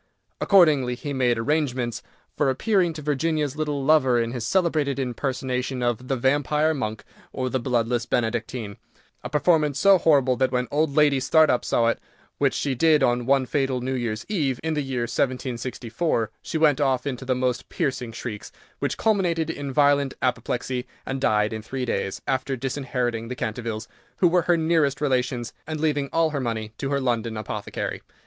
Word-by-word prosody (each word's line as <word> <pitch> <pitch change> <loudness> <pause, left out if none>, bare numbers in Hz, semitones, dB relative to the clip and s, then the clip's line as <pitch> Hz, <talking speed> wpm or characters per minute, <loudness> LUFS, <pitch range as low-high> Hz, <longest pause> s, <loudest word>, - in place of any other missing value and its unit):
Accordingly, 150 -10 +4
he 145 +3 -5
made 125 -3 +2
arrangements 125 -2 -1 0.3
for - - +2
appearing 180 - +2
to 155 -1 -8
Virginia's 150 0 0
little 150 -3 -2
lover 135 -6 +4
in 115 0 -1
his 120 -2 -4
celebrated 155 -7 +1
impersonation 130 0 -2
of 120 +1 -1
"The 135 - 0
Vampire 145 +4 +2
Monk, 110 -7 -4 0.3
or 130 -1 -3
the 130 - 0
Bloodless 120 -1 0
Benedictine," 115 -2 -2 0.5
a - - -5
performance 150 -1 +2
so 195 +3 +6
horrible 140 -6 +4
that 130 -1 +1
when 125 -1 0
old 145 -1 +1
Lady 150 -3 +4
Startup 155 -1 +3
saw 115 - +1
it, 115 - +1 0.4
which - - +2
she 140 - -1
did 155 +2 +4
on 120 -1 +1
one 135 -1 +3
fatal 135 0 0
New 130 +2 -3
Year's 115 -3 -3
Eve, 145 - -1
in 160 0 -1
the 150 - 0
year 130 -3 -2
1764, 125 +1 -2
she - - -3
went 150 -2 +3
off 135 -2 +1
into 135 -2 -3
the 130 -1 0
most 125 -1 -1
piercing 130 -4 -2
shrieks, 115 -2 -7 0.3
which - - -2
culminated 175 -7 +1
in 145 -3 -5
violent 140 -1 +3
apoplexy, 125 0 -2 0.2
and 135 0 -3
died 105 -3 +2
in 110 - -4
three 130 +3 -4
days, 95 -4 -3
after 130 +1 -1
disinheriting 125 -3 -2
the 125 - -5
Cantervilles, 110 -1 -4 0.3
who 180 - +4
were 175 +1 +3
her 175 +1 +2
nearest 160 -3 +2
relations, 125 -4 -1
and 155 -1 -4
leaving 145 -3 0
all 165 -1 +2
her 145 -2 -2
money 110 -3 -3
to 135 - -2
her 140 0 +1
London 115 -4 -1
apothecary. 110 - -4
130 Hz, 175 wpm, -24 LUFS, 120-150 Hz, 0.5 s, so